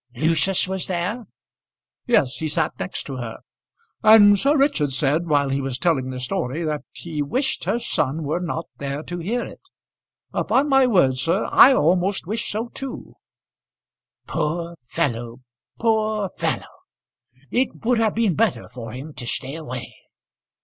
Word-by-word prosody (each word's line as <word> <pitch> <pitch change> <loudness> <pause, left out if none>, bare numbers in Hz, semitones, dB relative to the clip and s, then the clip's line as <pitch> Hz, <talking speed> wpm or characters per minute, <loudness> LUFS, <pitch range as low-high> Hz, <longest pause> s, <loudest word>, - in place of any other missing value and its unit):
"Lucius 165 +7 +2
was 190 -1 -2
there?" 185 +6 -2 0.8
"Yes; 145 - +2
he 160 - -2
sat 150 - 0
next - - -3
to 135 -2 -6
her. 120 -3 -5 0.6
And 205 -2 +7
Sir 285 +8 +3
Richard 270 - +2
said, 150 +5 +1
while 145 -3 +2
he 135 +1 0
was 135 -2 -3
telling 135 -4 +1
the 130 -1 -5
story, 125 +5 -2
that 150 -2 -2
he 160 -3 -5
wished 255 - -1
her - - +1
son 160 - -1
were 150 +4 -1
not 170 -2 -3
there 140 +2 -4
to 175 +1 -6
hear 230 +8 -2
it. - - -11 0.7
Upon 275 +3 +2
my 270 -2 +5
word, 155 - +3
sir, 165 +10 0
I 270 - +8
almost 180 - +2
wished 215 +5 -3
so 225 +3 -3
too." 270 +1 -7 1.1
"Poor 170 +2 -2
fellow, 120 -1 -2 0.4
poor 215 -3 +1
fellow! - - -2 0.8
It 250 -2 -1
would 240 -1 +3
have 220 -2 +1
been 220 -5 +2
better 225 +5 0
for 115 -3 -8
him 140 +5 -8
to 120 - -7
stay 135 +2 -3
away." 130 -6 -6
170 Hz, 155 wpm, -22 LUFS, 140-220 Hz, 1.1 s, I